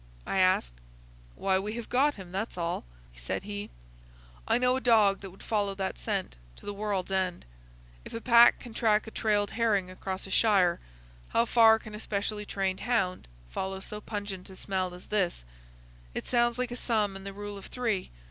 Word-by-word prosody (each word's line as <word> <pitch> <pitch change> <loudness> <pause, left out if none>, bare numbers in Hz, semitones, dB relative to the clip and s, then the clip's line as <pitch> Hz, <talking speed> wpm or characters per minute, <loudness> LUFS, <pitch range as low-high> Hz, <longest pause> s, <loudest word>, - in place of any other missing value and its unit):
I 195 - 0
asked. 185 - +3 0.6
"Why, 190 -1 +2
we 210 +2 -4
have 235 0 -5
got 285 +4 +3
him, 185 -3 -10
that's 195 +2 -3
all," 170 - -2 0.3
said - - -4
he. 205 +1 -5 0.8
"I - - +4
know 250 +1 +3
a 265 - -2
dog 215 -5 +5
that 195 - -8
would 190 - -15
follow 205 -3 0
that 190 - -3
scent - - -2 0.2
to - - -14
the 205 - -3
world's 200 -2 -2
end. 185 -2 -1 0.6
If - - -9
a - - -2
pack 235 0 +7
can 240 - -10
track 215 -2 +2
a 220 - -8
trailed 205 -3 +1
herring 205 -5 +1
across 190 0 -5
a 195 - -9
shire, 190 -5 +4 0.5
how 230 - +3
far 225 -2 +6
can 215 -1 -11
a 210 - -6
specially 210 0 -3
trained 190 -1 -1
hound 195 -7 0 0.2
follow 190 - -3
so 210 +2 -6
pungent 205 -3 -5
a 190 - -11
smell 185 -2 -2
as 180 - -13
this? 185 - 0 0.7
It - - -3
sounds 240 -1 +2
like 250 -1 -2
a - - -3
sum 215 -5 0
in 195 - -8
the 200 - -5
rule 205 +1 -6
of 200 - -9
three. 225 -7 -1
205 Hz, 195 wpm, -29 LUFS, 190-225 Hz, 0.8 s, pack